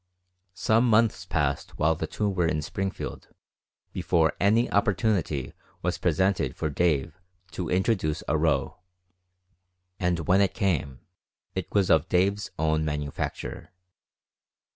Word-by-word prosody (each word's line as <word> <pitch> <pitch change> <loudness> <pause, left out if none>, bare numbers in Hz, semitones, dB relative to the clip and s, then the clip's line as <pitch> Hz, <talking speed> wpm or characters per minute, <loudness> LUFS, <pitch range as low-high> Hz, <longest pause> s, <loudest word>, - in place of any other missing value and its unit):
Some 110 +5 +3
months 110 -4 +2
passed 70 -4 -1
while 80 +1 +3
the 80 - -4
two 105 - -2
were 90 -4 +1
in 75 -2 -1
Springfield 95 +4 -4 0.7
before 85 -2 +2
any 110 +5 +3
opportunity 100 - 0 0.3
was - - -1
presented 95 0 +1
for 80 - -2
Dave 80 +1 0 0.3
to 90 - -4
introduce 90 -5 0
a - - +1
row, 75 -3 0 1.2
and 90 -3 0
when 95 +2 +5
it 100 - +1
came 75 -10 -1 0.5
it - - -4
was 100 -3 +2
of 80 +2 +3
Dave's 100 +3 +1
own 80 0 +1
manufacture. 75 +2 -4
90 Hz, 120 wpm, -26 LUFS, 80-100 Hz, 1.2 s, when